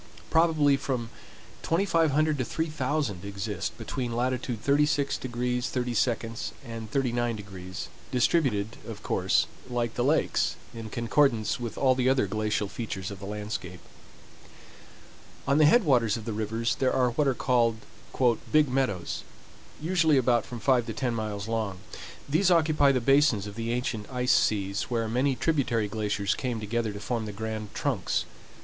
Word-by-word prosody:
Probably 155 Hz, -4 st, +4 dB
from 125 Hz, -4 st, -3 dB, 0.5 s
2500 160 Hz, -4 st, +2 dB
to -, -, +1 dB
3000 145 Hz, -, -2 dB
exist 100 Hz, -1 st, -4 dB
between 120 Hz, -4 st, -4 dB
latitude 125 Hz, -2 st, -1 dB
36° 145 Hz, 0 st, +2 dB
30′ 125 Hz, -1 st, -1 dB
and 115 Hz, -2 st, -7 dB
39°, 110 Hz, -8 st, -2 dB, 0.2 s
distributed, 125 Hz, -5 st, +1 dB
of 110 Hz, -2 st, -8 dB
course, 95 Hz, 0 st, +2 dB, 0.2 s
like 120 Hz, -2 st, -1 dB
the 120 Hz, -, -1 dB
lakes, 150 Hz, +5 st, +2 dB, 0.2 s
in 115 Hz, -1 st, -7 dB
concordance 115 Hz, -1 st, +1 dB
with 120 Hz, -3 st, -5 dB
all 130 Hz, -2 st, +4 dB
the 130 Hz, 0 st, +2 dB
other 130 Hz, -5 st, +3 dB
glacial 105 Hz, +1 st, -1 dB
features 100 Hz, -3 st, -5 dB
of 100 Hz, -, -8 dB
the 100 Hz, -, -7 dB
landscape. 105 Hz, -4 st, -5 dB, 1.7 s
On 140 Hz, +2 st, +3 dB
the 155 Hz, -, +7 dB
head 240 Hz, +8 st, +5 dB
waters 120 Hz, -, +3 dB
of 110 Hz, -, -8 dB
the 115 Hz, -, -3 dB
rivers 110 Hz, +2 st, -1 dB
there 130 Hz, -1 st, +1 dB
are 125 Hz, -2 st, +2 dB
what 145 Hz, +4 st, +1 dB
are 135 Hz, -, +2 dB
called 120 Hz, -3 st, +2 dB, 0.7 s
"Big 155 Hz, -2 st, +4 dB
Meadows," 125 Hz, -9 st, -1 dB, 0.6 s
usually 160 Hz, -2 st, +3 dB
about 120 Hz, -2 st, +2 dB
from 120 Hz, -, -6 dB
five 125 Hz, 0 st, +2 dB
to 115 Hz, -, -3 dB
ten 120 Hz, +2 st, -1 dB
miles 105 Hz, -2 st, -3 dB
long. 110 Hz, -4 st, -2 dB, 0.5 s
These 160 Hz, +7 st, +3 dB
occupy 155 Hz, -4 st, +4 dB
the 130 Hz, -2 st, +1 dB
basins 135 Hz, -5 st, +4 dB
of 105 Hz, -, -7 dB
the 115 Hz, +2 st, -3 dB
ancient 120 Hz, -3 st, -3 dB
ice 125 Hz, 0 st, +1 dB
seas, 100 Hz, -1 st, +1 dB
where 115 Hz, -2 st, 0 dB
many 130 Hz, +4 st, +1 dB
tributary 125 Hz, -5 st, +1 dB
glaciers 105 Hz, -1 st, -1 dB
came 125 Hz, -3 st, -3 dB
together 110 Hz, +1 st, -1 dB
to 100 Hz, -, -7 dB
form 115 Hz, 0 st, -2 dB
the -, -, -4 dB
grand 110 Hz, 0 st, -5 dB
trunks. -, -, -1 dB
120 Hz, 150 wpm, -28 LUFS, 110-135 Hz, 1.7 s, the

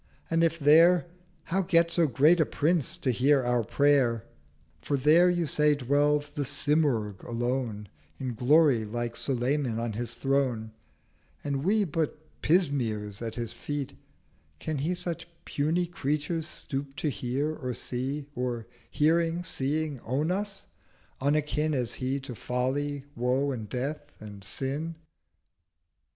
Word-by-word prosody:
and 165 Hz, 0 st, +3 dB
if 165 Hz, 0 st, +2 dB
there 165 Hz, +4 st, +6 dB, 0.4 s
How 190 Hz, +3 st, 0 dB
get 170 Hz, -2 st, +3 dB
so 170 Hz, -2 st, +3 dB
great 150 Hz, +7 st, +4 dB
a -, -, +6 dB
Prince 155 Hz, -1 st, 0 dB
to 130 Hz, -, 0 dB
hear 135 Hz, +3 st, +3 dB
our 120 Hz, -1 st, +1 dB
Prayer? 130 Hz, -2 st, +2 dB, 0.6 s
For 140 Hz, -, 0 dB
there, 155 Hz, +6 st, +5 dB
you 175 Hz, -1 st, +1 dB
say, 150 Hz, -1 st, +3 dB
dwells 145 Hz, +2 st, +1 dB
The 145 Hz, 0 st, -4 dB
Symurgh 140 Hz, -8 st, 0 dB
alone 120 Hz, -3 st, -2 dB, 0.3 s
In 130 Hz, -3 st, -3 dB
Glory, 130 Hz, 0 st, +4 dB
like 120 Hz, +2 st, -3 dB
Sulayman 130 Hz, -1 st, -1 dB
on 115 Hz, -1 st, -2 dB
his 120 Hz, +2 st, -3 dB
Throne, 130 Hz, -5 st, 0 dB, 0.7 s
And 140 Hz, -1 st, -2 dB
we 210 Hz, +4 st, +3 dB
but 160 Hz, -4 st, -1 dB, 0.2 s
Pismires 120 Hz, -, +1 dB
at 115 Hz, -1 st, -4 dB
his 120 Hz, -2 st, -4 dB
feet: 145 Hz, +1 st, -4 dB, 0.6 s
can 155 Hz, -, -3 dB
He 165 Hz, +6 st, 0 dB
Such 175 Hz, -1 st, -2 dB, 0.2 s
puny 160 Hz, +5 st, 0 dB
Creatures 155 Hz, 0 st, -2 dB
stoop 140 Hz, -3 st, -5 dB
to 155 Hz, -, -2 dB
hear, 135 Hz, +4 st, -2 dB
or 125 Hz, -4 st, -4 dB
see; 135 Hz, +4 st, -3 dB
Or 120 Hz, -3 st, -3 dB, 0.2 s
hearing, 165 Hz, +3 st, +2 dB
seeing, 150 Hz, -2 st, -2 dB
own 140 Hz, +9 st, -1 dB
us—unakin 155 Hz, -6 st, -2 dB
As 125 Hz, -3 st, -1 dB
He 130 Hz, +2 st, -2 dB
to 130 Hz, -1 st, -7 dB
Folly, 135 Hz, +4 st, -2 dB
Woe, 130 Hz, +4 st, +1 dB
and 110 Hz, -5 st, -5 dB
Death, 145 Hz, +5 st, -4 dB
and 100 Hz, -2 st, -10 dB
Sin?' 140 Hz, +10 st, -3 dB
140 Hz, 135 wpm, -28 LUFS, 125-155 Hz, 0.7 s, there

